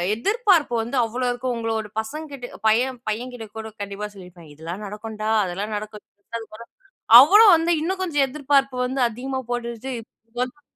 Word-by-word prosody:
எதிர்பார்ப்பு 380 - +2
வந்து 240 +4 -5
அவ்ளோ 245 +3 -3
இருக்கு, 245 +1 -4
உங்களோட 225 -2 -2
பசங்க 305 +8 -8
கிட்ட 245 -3 -7 0.2
பையன் 245 +3 +2
பையன்கிட்ட 235 +1 -5
கூட 220 0 -5
கண்டிப்பா 200 +1 -5
சொல்லியிருப்பீங்க," 175 -5 -13
இதெல்லாம் 170 +6 -7
நடக்கும்டா, 215 +1 -5
அதெல்லாம் 195 +4 -4
நடக்கும்," 210 0 -8 1.2
அவ்வளோ 400 +11 +7
வந்து 330 +1 0
இன்னும் 375 +4 -2
கொஞ்சம் 295 -6 +1
எதிர்பார்ப்பு 275 -1 +1
வந்து 260 0 -1
அதிகமா 260 +3 -4
போட்டுட்டு 240 +2 -4 0.5
வந் 255 +4 -5
245 Hz, 140 wpm, -23 LUFS, 215-275 Hz, 1.2 s, அவ்வளோ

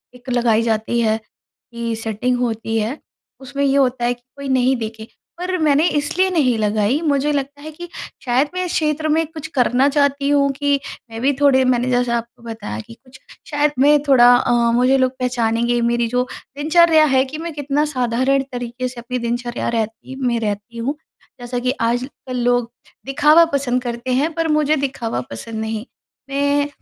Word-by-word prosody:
एक 250 +1 -12
लगाई 235 -3 +2
जाती 225 +1 0
है 220 -1 +2
की 230 +1 -8
सेटिंग 225 +3 -1
होती 225 -2 -2
है, 225 +8 -3 0.4
उसमें 275 +1 -4
ये 275 -1 +2
होता 250 -3 +1
है 245 - +2
कि 245 - -18
कोई 280 0 -7
नहीं 260 0 +3
देखे। 220 -1 -6 0.3
पर 365 +1 -2
मैंने 310 0 +3
इसलिए 350 +6 +1
नहीं 280 -10 +2
लगाई 210 +6 +1
मुझे 295 -2 +1
लगता 285 0 -3
है, 310 +1 -8
कि 350 +3 -9 0.4
शायद 260 +4 +2
मैं 365 - -2
इस 350 - -4
क्षेत्र 310 -1 0
में 320 +2 +2
कुछ 315 -1 -8
करना 255 +2 +3
चाहती 280 -1 +1
हूँ 280 -1 +3
कि 285 0 +1 0.3
मैं 225 +1 -6
भी 275 +2 +3
थोड़े 270 -2 +5
मैंने 250 0 +1
जैसा 245 -1 +1
आपको 235 +1 -8
बताया 225 -2 -6
कि 230 - -11
कुछ 260 +2 -18 0.3
शायद 295 0 +2
मैं 295 +2 +6
थोड़ा 245 -3 +7
अ, 245 - +1 0.2
मुझे 250 +3 +3
लोग 260 -1 +2
पहचानेंगे 240 -1 0
मेरी 235 0 +1
जो 250 +2 0 0.3
दिनचर्या 315 +1 +5
है 260 - +5
कि 280 +3 -7
मैं 330 0 -5
कितना 290 0 0
साधारण 255 +3 +1
तरीके 245 0 -4
से 245 -1 -8
अपनी 250 +1 -4
दिनचर्या 240 +1 -2
रहती 225 +4 -4
मैं 235 -1 +1
रहती 210 +2 -4
हूँ। 270 +6 -2 0.4
जैसा 245 0 -3
कि 250 +1 0
आजकल 250 +2 -2
लोग 245 -1 +1 0.3
दिखावा 300 +5 +5
पसंद 255 -3 0
करते 235 +1 -4
हैं, 285 +6 +1
पर 330 0 -1
मुझे 305 -1 +2
दिखावा 250 - -2
पसंद 220 - -6
नहीं। 220 0 -4 0.4
मैं 285 +1 +1
255 Hz, 180 wpm, -19 LUFS, 235-285 Hz, 0.4 s, थोड़ा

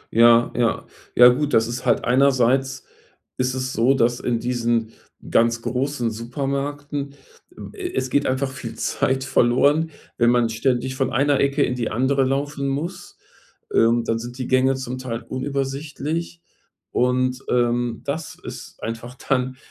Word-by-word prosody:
Ja 115 0 +6
ja 120 -1 0 0.3
ja 125 - +9
gut, 145 +4 0
das 115 0 +3
ist 120 +1 -5
halt - - +3
einerseits, 130 0 +2 0.5
ist 130 0 0
es 130 0 -3
so, 125 +4 +3
dass 120 -1 +2
in 120 -2 -1
diesen 120 -2 0 0.4
ganz 115 0 +2
großen 125 -2 -1
Supermärkten, 140 +4 -4 0.6
äh, 365 -2 -5
es 130 - -1
geht 145 - +2
einfach 130 +1 -1
viel 120 -3 -7
Zeit 130 0 0
verloren, 140 +6 +3 0.3
wenn 120 -1 +4
man 120 -1 +3
ständig 125 +3 0
von 130 -1 -1
einer 140 +2 +2
Ecke 140 +1 +2
in 125 - 0
die 120 -3 -2
andere 130 +4 +1
laufen 140 +1 -1
muss. 150 +7 -4 0.6
Ähm, 115 +1 +3
dann 115 0 -1
sind 120 +2 -8
die 130 - -4
Gänge 130 +1 +3
zum 130 -1 -5
Teil 120 -2 -5
unübersichtlich, 145 +5 -3 0.5
und, 125 +1 +1
ähm, 120 -1 +1
das 145 +4 -4
ist - - -10
einfach 115 +2 -5
dann 130 -1 -1
130 Hz, 150 wpm, -22 LUFS, 120-140 Hz, 0.6 s, ja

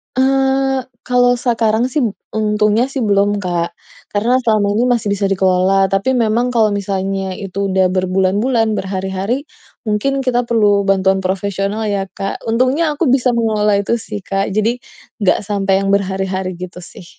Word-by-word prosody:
Eee, 270 0 +1 0.2
kalau 245 0 +3
sekarang 235 -1 +1
sih 260 - -4
bu 215 - -2 0.2
untungnya 210 +2 +2
sih 270 0 -4
belum, 205 -1 +1
Kak. 170 -2 -2 0.4
Karena 230 +5 +2
selama 215 -3 +2
ini 235 - +2
masih 225 -3 -1
bisa 200 0 0
dikelola, 190 0 +2
tapi 195 +7 +1
memang 240 +1 +1
kalau 220 -3 +3
misalnya 195 -1 -2
itu 200 +1 -4
udah 190 -1 +2
berbulan-bulan, 195 +5 +1
berhari-hari 190 +5 -2 0.5
mungkin 270 +6 0
kita 245 -2 0
perlu 210 -4 +2
bantuan 195 -1 +2
profesional 195 +2 -2
ya, 200 -1 -1
Kak. 195 0 -5
Untungnya 255 +8 +1
aku 295 -1 0
bisa 250 -1 +2
mengelola 215 -3 +1
itu 235 +4 0
sih, 215 -2 -7
Kak. 195 +1 -2
Jadi 220 +4 +1 0.4
nggak 200 -5 +2
sampai 195 -2 0
yang 195 - -1
berhari-hari 190 -1 -1
gitu, 180 -1 -7
sih. 180 0 -11
205 Hz, 155 wpm, -17 LUFS, 195-235 Hz, 0.5 s, kalau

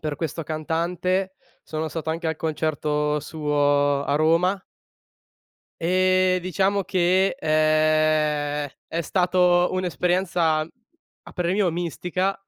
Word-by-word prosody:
per 150 -2 -4
questo 165 0 -4
cantante 175 +5 -2 0.3
sono 155 0 -4
stato 160 0 -5
anche 165 +1 -3
al 160 - -1
concerto 150 -1 -1
suo 145 -2 +1
a 140 - -1
Roma. 170 +5 +2 1.2
Uhm, 185 +1 +2
diciamo 190 +2 0
che, 185 +3 +2
ehm, 155 - +1 0.2
è 165 - -3
stato 180 +1 +2
un'esperienza, 175 -2 0
a 230 - -13
parer 175 -1 -1
mio 195 -3 +2
mistica, 180 +3 -2
165 Hz, 105 wpm, -23 LUFS, 155-185 Hz, 1.2 s, Roma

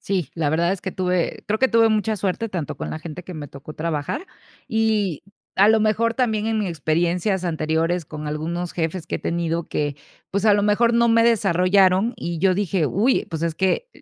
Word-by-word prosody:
Sí, 185 -8 -2
la 155 -3 0
verdad 170 +4 +2
es 195 - -4
que 190 - -4
tuve, 180 -2 -1
creo 215 +1 0
que 260 - +3
tuve 230 -1 +4
mucha 220 0 +1
suerte, 200 +4 -2
tanto 170 -7 -4
con - - -5
la 155 - -4
gente 165 +2 -8
que 180 - -9
me 145 -2 -7
tocó 140 +3 -10
trabajar. 155 - -3 0.4
Y, 220 - 0 0.3
a 200 +2 +6
lo 220 0 +5
mejor, 220 +2 +2
también 220 -4 0
en 220 -1 0
experiencias 175 +2 0
anteriores 165 +1 0
con 150 0 -7
algunos 165 +4 -3
jefes 165 +1 -3
que - - -4
he - - -1
tenido 170 0 -1
que, 145 -1 -2 0.4
pues, 200 +2 0
a 210 - +6
lo 205 0 +3
mejor 230 +3 +3
no 235 0 +3
me 230 0 +5
desarrollaron, 195 0 +3
y 170 -1 -4
yo 185 +1 +3
dije: 190 -5 0
"Uy, 230 - +2
pues, 160 0 -4
es 165 -1 -1
que 190 - 0
185 Hz, 205 wpm, -22 LUFS, 165-215 Hz, 0.4 s, a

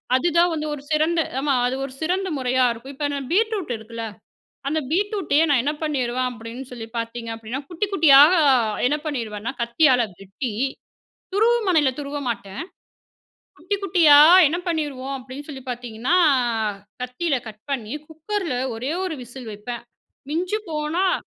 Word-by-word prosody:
அதுதான் 340 +4 +3
வந்து 305 -1 -3
ஒரு 285 - -6
சிறந்த 315 +2 +2 0.2
ஆமா 280 -1 +1
அது 250 - 0
ஒரு 260 - -9
சிறந்த 370 +4 0
முறையா 255 0 +1
இருக்கும். 235 +4 -8
இப்ப 290 +1 -1
இன்ன 285 - -2
பீட்ரூட் 420 - +1
இருக்குல்ல, 225 +1 -7 0.6
அந்த 315 +2 +1
பீட்ரூட்டயே 380 -4 +2
நான் 275 -4 +4
என்ன 295 +2 0
பண்ணிருவேன் 255 -4 0
அப்டின்னு 240 +2 -8
சொல்லி 230 -2 -7
பாத்தீங்க 230 0 -4
அப்டின்னா, 225 +4 -5
குட்டி 350 +4 -1
குட்டியா 295 -7 +8 0.7
என்ன 295 +3 +1
பண்ணிருவேன்னா, 230 -5 -3
கத்தியால 250 +1 +4 0.2
வெட்டி 200 +5 -5 0.8
துருவுமனையில 405 - +3
துருவ 290 0 -4
மாட்டேன். 225 -1 -4 1.0
குட்டி 365 +6 -2
குட்டியா 330 -6 +6 0.3
என்ன 340 - -1
பண்ணிருவோம் 285 -5 -2
அப்டின்னு 260 +3 -9
சொல்லி 270 -3 -8
பாத்தீங்கன்னா, 245 +6 -1 0.9
கத்தியில 255 +3 -1
கட் 215 0 -12
பண்ணி 235 -1 -3
குக்கர்ல 325 -1 -3 0.2
ஒரே 255 +6 -3
ஒரு 360 - -2
விசில் 245 -1 -9
வைப்பேன். 235 +3 -7 0.5
மிஞ்சி 365 +7 -1
போனா 315 +5 0
280 Hz, 140 wpm, -23 LUFS, 245-325 Hz, 1.0 s, குட்டியா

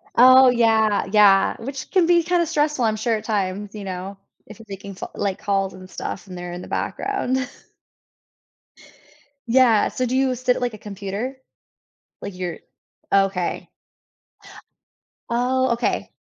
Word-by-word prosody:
Oh, 255 +1 +8
yeah. 225 -3 +2
Yeah. 200 -2 +5
Which 270 +3 -6
can 365 -3 +4
be 340 -1 +4
kinda 350 0 +1
stressful, 300 -4 0
I'm 220 -1 +2
sure, 225 +1 0
at 215 - -5
times, 205 -1 -2
you 210 -2 -7
know, 190 +1 -6 0.3
if 215 - -13
you're 225 - -13
making 200 0 -8
f - - -4
like, 200 -2 -2
calls 195 -1 -1
and 185 0 -12
stuff, 190 +1 -6
and 180 -1 -9
they're 175 0 -6
in 180 - -7
the - - -10
background. 390 -11 -2 2.1
Yeah. 235 -3 +4
So 255 - -2
do 250 +2 -2
you 265 -1 +2
sit 250 0 +1
at, - - -5
like, 245 -2 -1
a - - -8
computer? 205 +5 -5 0.9
Like, 200 - -7
you're 180 -3 -4 0.5
okay. 195 -2 +1 1.6
Oh, 255 +2 +1
okay. 235 - -2
220 Hz, 150 wpm, -22 LUFS, 195-255 Hz, 2.1 s, Oh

